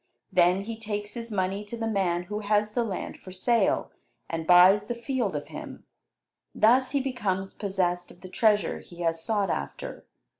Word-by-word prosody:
Then 180 +1 +4
he 225 +2 -6
takes 210 -1 -4
his 230 -1 -6
money 195 0 -1
to 235 +3 -6
the 225 - -2
man 185 -5 0
who 210 +4 -4
has 210 0 +1
the 240 +2 0
land 200 -5 -5
for 185 - -11
sale, 230 +5 +1 0.4
and 165 -1 -3
buys 185 +4 +7
the 240 - -2
field 235 - -2
of 145 - -5
him. - - -8 0.7
Thus 250 +4 +4
he 280 - +1
becomes 205 -8 -2
possessed 180 -3 -1
of 175 - -16
the 185 - -9
treasure 210 -2 +2
he 175 0 -12
has 165 -1 0
sought 205 -4 0
after. 70 - -5
205 Hz, 180 wpm, -27 LUFS, 180-225 Hz, 0.7 s, buys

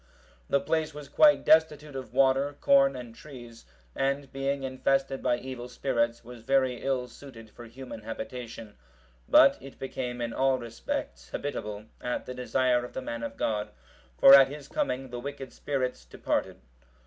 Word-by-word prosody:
The 140 - +3
place 155 0 -1
was 150 -1 -8
quite 295 - +5
destitute 150 -2 +3
of 130 -4 -6
water, 135 +2 +2
corn, 135 -1 +4
and 120 -2 -8
trees; 120 - -12 0.3
and 135 0 -1
being 135 0 -2
infested 135 +1 0
by 125 -1 +1
evil 125 -1 -7
spirits, 115 -3 -1
was 120 0 -11
very 130 0 +1
ill 130 -2 -1
suited 115 -4 -13
for 120 - -12
human 125 0 -9
habitation; 115 0 -7 0.6
but - - +6
it 135 0 -12
became 125 -2 -5
in 120 -1 -3
all 135 0 +2
respects 65 - -5
habitable, 105 - -5 0.2
at 125 - -3
the 125 - -6
desire 125 0 +1
of 125 - -9
the - - -4
man 115 -2 -5
of 115 - -6
God; 105 -1 -1 0.5
for 135 - +9
at 135 -1 +9
his 145 0 -9
coming 130 -1 -2
the 120 - -5
wicked 135 0 -7
spirits 130 -3 -3
departed. - - -3
130 Hz, 160 wpm, -28 LUFS, 120-135 Hz, 0.6 s, for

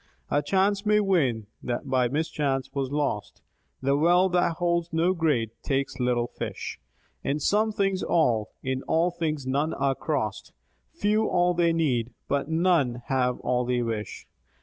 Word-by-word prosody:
A 145 - +3
chance 195 +5 +1
may 210 0 +4
win 145 - +1 0.2
that 120 -1 -3
by 130 -2 +2
mischance 140 -2 -1
was 135 -2 -2
lost; 135 -9 -2 0.4
That 140 +1 +2
net 175 +4 +4
that 175 -1 +2
holds 170 0 0
no 165 +3 +2
great, 145 - +1
takes 135 -1 -2
little 125 -1 +1
fish; - - -6 0.4
In 145 +2 -1
some 215 +8 +2
things 195 -2 0
all, 115 -10 +2
in 130 0 -2
all 170 +2 +2
things 155 -5 -2
none 140 +4 0
are 135 0 +1
crossed; 130 -8 -3 0.4
Few 215 +1 +1
all 175 0 +3
they 170 -1 +2
need, 125 -8 0
but 140 +1 -1
none 160 -8 +2
have 125 -2 +1
all 125 0 +1
they 125 0 0
wish. 110 -3 -4
145 Hz, 155 wpm, -26 LUFS, 125-175 Hz, 0.4 s, may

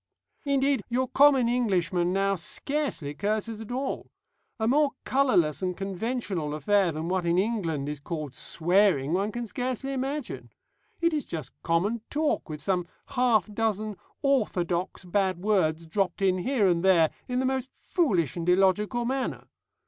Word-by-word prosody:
"Indeed, 275 -2 +2
your 255 +2 +1
common 270 -2 +5
Englishman 185 -7 +1
now 195 +1 +2
scarcely 195 - -3
curses 215 +5 -2
at 225 - -8
all. 265 +2 -3 0.5
A 220 - +1
more 285 +3 +3
colourless 250 - +2
and 180 -1 -2
conventional 195 -5 -3
affair 190 +4 +2
than 155 +1 -4
what 185 0 0
in 170 0 +1
England 185 -9 0
is 150 -1 -4
called 150 -2 -5
swearing 170 -4 +2
one 200 +4 0
can 240 +2 -4
scarcely 255 +3 -3
imagine. 270 +1 -4 0.5
It 335 -1 +3
is 300 -3 0
just 160 -4 -6
common 195 +8 0
talk, 300 - 0
with 150 -1 -6
some 180 -3 0 0.2
half 240 -7 +3
dozen 215 -1 -1 0.3
orthodox 185 -10 0
bad 190 0 +1
words 175 -5 +1
dropped 195 +4 -1
in 185 -1 +3
here 230 0 +2
and 170 -1 +2
there 175 -4 +5 0.2
in 250 - -2
the 260 - +1
most 265 0 -1
foolish 185 - 0
and 170 0 -2
illogical 195 +6 +2
manner. 265 +2 -2
200 Hz, 150 wpm, -27 LUFS, 175-250 Hz, 0.5 s, common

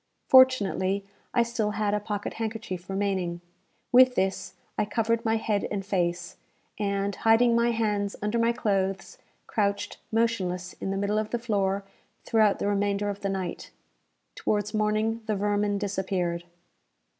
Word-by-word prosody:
Fortunately, 200 -7 +4 0.3
I 240 - +3
still 230 -3 -1
had 210 -1 +1
a 210 - +2
pocket 205 0 -4
handkerchief 215 -5 -5
remaining. 190 -3 -1 0.5
With 255 0 +7
this 190 0 -1 0.2
I - - +1
covered 225 +2 0
my 225 0 +2
head 215 -2 0
and 200 -2 -3
face, 175 -3 -1 0.4
and, 200 -1 -1
hiding 230 +1 +4
my 235 0 +3
hands 210 -3 0
under 210 +3 -1
my 230 0 +3
clothes, 195 -5 -1 0.3
crouched 200 -2 -1
motionless 190 -6 0
in - - -2
the 195 - -1
middle 200 +2 0
of 215 0 -3
the 240 - -1
floor 200 -4 0 0.4
throughout 215 -3 +3
the - - -2
remainder 205 0 0
of 200 - -8
the 195 - -1
night. 190 -2 -4 0.6
Towards 210 0 -1
morning 215 +1 0
the 215 - +1
vermin 205 0 0
disappeared. 190 -4 -2
205 Hz, 145 wpm, -27 LUFS, 195-225 Hz, 0.6 s, With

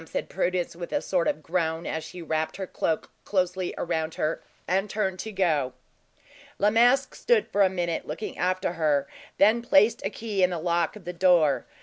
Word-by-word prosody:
said - - -4
Prudence, 180 -2 -1
with 170 0 -7
a 290 - +1
sort 180 -10 0
of 155 - -1
groan, 165 -1 -1
as 160 0 -3
she 180 -1 -9
wrapped 160 0 -2
her 195 - -3
cloak 160 -3 -2
closely 185 -2 0
around 160 -2 -2
her, 155 +1 -1 0.3
and 195 +3 +1
turned 190 -3 -1
to 220 - -5
go. 155 -10 +1 0.8
La 205 +1 +3
Masque 245 +4 +4
stood 470 -4 +2
for 205 - +1
a 190 - +6
moment 175 -3 -2
looking 160 +8 -5
after 185 0 0
her, 150 -4 +1
and - - -20
then 220 +4 +5
placed 220 -1 +4
a 195 - 0
key 210 -2 -3
in 180 - +5
the 175 - -3
lock 170 +1 0
of 205 -5 -12
the 180 - -4
door. 175 -5 +3
180 Hz, 200 wpm, -26 LUFS, 165-195 Hz, 0.8 s, a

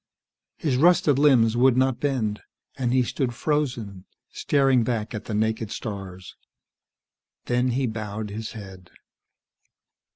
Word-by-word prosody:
His 140 -6 0
rusted 155 -3 +4
limbs 120 -6 +4
would 125 +1 +4
not 130 -1 +2
bend, 120 -7 -1 0.3
and 125 -3 -1
he 130 0 +3
stood 120 0 -2
frozen, 120 -11 -2 0.3
staring 135 -4 +2
back 110 -2 -2
at 110 -1 -6
the 110 - -4
naked 110 0 -1
stars. 95 -5 -7 1.1
Then 125 +1 +1
he 135 - +1
bowed 110 -2 -5
his 110 +1 -6
head. 95 -4 -11
120 Hz, 125 wpm, -24 LUFS, 105-130 Hz, 1.1 s, rusted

